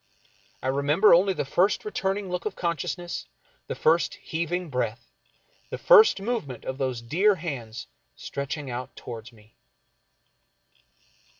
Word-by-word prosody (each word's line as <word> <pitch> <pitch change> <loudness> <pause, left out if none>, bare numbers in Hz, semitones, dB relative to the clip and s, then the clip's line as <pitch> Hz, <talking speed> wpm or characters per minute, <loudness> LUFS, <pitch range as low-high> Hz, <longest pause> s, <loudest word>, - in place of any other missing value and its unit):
I - - -1
remember 145 +9 +4
only 190 +3 +5
the 175 - -2
first 185 - +1
returning 200 - -2
look 180 -1 -3
of 205 - -5
consciousness, 175 +1 -3 0.4
the - - -4
first 160 -2 +2
heaving 170 +1 -3
breath, 120 -2 -3 0.6
the - - -4
first 445 - +7
movement 195 - -4
of 130 0 -4
those 130 -3 -2
dear 190 - +3
hands 125 -10 -6 0.3
stretching 140 0 -5
out 125 +1 -6
toward 115 +1 -8
me. 110 -1 -21
155 Hz, 125 wpm, -26 LUFS, 130-185 Hz, 0.6 s, first